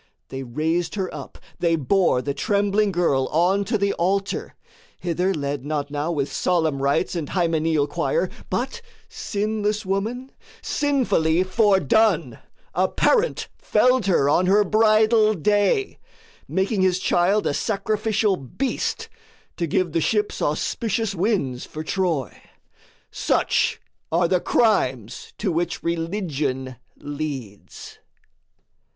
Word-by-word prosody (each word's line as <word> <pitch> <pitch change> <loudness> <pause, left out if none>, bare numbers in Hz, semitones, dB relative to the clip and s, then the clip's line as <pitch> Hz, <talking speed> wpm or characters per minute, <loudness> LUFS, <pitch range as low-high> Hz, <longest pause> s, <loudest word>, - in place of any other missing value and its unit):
They 135 - -5
raised 160 - -2
her 190 -3 -3
up, 140 -3 -9 0.2
they 170 -1 +2
bore 160 -3 +2
the 140 - -2
trembling 205 +6 +1
girl 155 -7 +1
On 180 +5 +2
to 220 +2 0
the 200 0 0
altar 195 +3 -1 0.4
hither 180 +2 0
led 145 -5 -3
not 145 -1 -3
now 150 +3 -2
With 145 -4 -2
solemn 160 -6 0
rites 140 +7 +1
and 160 -4 -3
hymeneal 165 -4 +1
choir, 485 - -1 0.2
But 470 - -2 0.3
sinless 210 0 -2
woman, 225 +8 -2 0.3
sinfully 205 - +1
foredone, 205 - +2 0.3
A - - +2
parent - - +1
felled 255 -4 +2
her 170 -7 +3
on 180 +5 +3
her 205 +2 +5
bridal 215 +1 +4
day, 205 - +1 0.5
Making 190 +1 0
his 185 -1 +3
child 185 +3 +2
a - - +1
sacrificial 215 +1 0
beast 260 - -3 0.5
To 170 - -1
give 175 +2 0
the 165 +1 0
ships 210 +4 0
auspicious 220 +7 -1
winds 175 - -1
for 155 - -7
Troy: 165 - -1 0.8
Such - - +1 0.3
are 170 +1 +3
the 185 +1 +2
crimes 130 - 0
to 200 -4 -1
which 170 +1 -2
Religion 155 - -2 0.2
leads. 140 -8 -7
180 Hz, 120 wpm, -23 LUFS, 155-210 Hz, 0.8 s, her